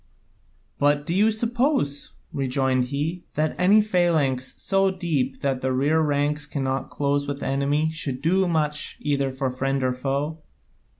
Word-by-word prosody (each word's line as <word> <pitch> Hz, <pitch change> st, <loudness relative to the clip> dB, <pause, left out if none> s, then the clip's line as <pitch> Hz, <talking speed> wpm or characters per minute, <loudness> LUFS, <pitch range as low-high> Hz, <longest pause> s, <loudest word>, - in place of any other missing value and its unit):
"But 145 Hz, 0 st, +2 dB
do 165 Hz, -, -1 dB
you 205 Hz, +4 st, +4 dB
suppose," 235 Hz, -, 0 dB, 0.2 s
rejoined 130 Hz, -1 st, +1 dB
he, 150 Hz, +7 st, -3 dB
"that 155 Hz, +1 st, +1 dB
any 200 Hz, +4 st, +6 dB
phalanx 160 Hz, -10 st, +1 dB
so 195 Hz, 0 st, +2 dB
deep 165 Hz, -9 st, -2 dB
that 135 Hz, -2 st, -1 dB
the 130 Hz, -, 0 dB
rear 145 Hz, +5 st, +2 dB
ranks 145 Hz, 0 st, 0 dB
cannot 135 Hz, -2 st, -2 dB
close 140 Hz, 0 st, 0 dB
with 140 Hz, 0 st, -4 dB
the -, -, -3 dB
enemy 145 Hz, +3 st, +1 dB
could 130 Hz, -3 st, -3 dB
do 185 Hz, +6 st, +2 dB
much 150 Hz, -3 st, -1 dB
either 140 Hz, -2 st, 0 dB
for 130 Hz, 0 st, -2 dB
friend 135 Hz, +1 st, -1 dB
or 130 Hz, -1 st, +1 dB
foe? 140 Hz, +5 st, -2 dB
145 Hz, 155 wpm, -24 LUFS, 135-165 Hz, 0.2 s, any